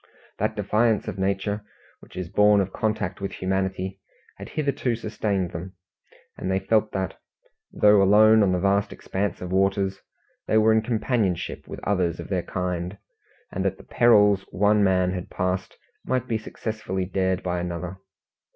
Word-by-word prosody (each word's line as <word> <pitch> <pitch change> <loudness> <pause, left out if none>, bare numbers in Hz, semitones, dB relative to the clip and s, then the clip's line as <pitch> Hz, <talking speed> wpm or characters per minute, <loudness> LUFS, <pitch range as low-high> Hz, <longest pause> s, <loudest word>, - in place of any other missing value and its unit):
That - - 0
defiance 110 0 +1
of - - -5
Nature 100 +2 -1 0.4
which - - -17
is 90 -1 -4
born 105 +3 +4
of 95 -1 -1
contact 105 -3 -2
with 100 - -3
humanity, 95 0 -2 0.4
had - - -9
hitherto 140 -5 -1
sustained 100 -5 -2
them, 90 +3 -7 0.6
and - - -4
they 95 - +2
felt 110 +3 +1
that, 95 -1 -3 0.5
though 105 -1 +5
alone 110 +3 +6
on 100 -3 +3
the 90 - +1
vast 100 +2 +1
expanse 100 0 -3
of 90 0 -5
waters, 95 0 +1 0.5
they 110 - +3
were 110 0 +5
in 110 - +3
companionship 110 -5 -1
with - - -7
others 90 -4 0
of - - -7
their 95 -3 0
kind, 90 +1 -3 0.5
and - - -2
that - - -1
the - - -14
perils 105 -4 +4
one 105 +2 +3
man 95 -1 +3
had 90 -1 -5
passed 90 0 -2 0.3
might 130 -1 -1
be 115 -2 -1
successfully 110 -4 -4
dared 95 0 -1
by 90 -1 -1
another. 90 +1 -4
95 Hz, 160 wpm, -25 LUFS, 95-105 Hz, 0.6 s, alone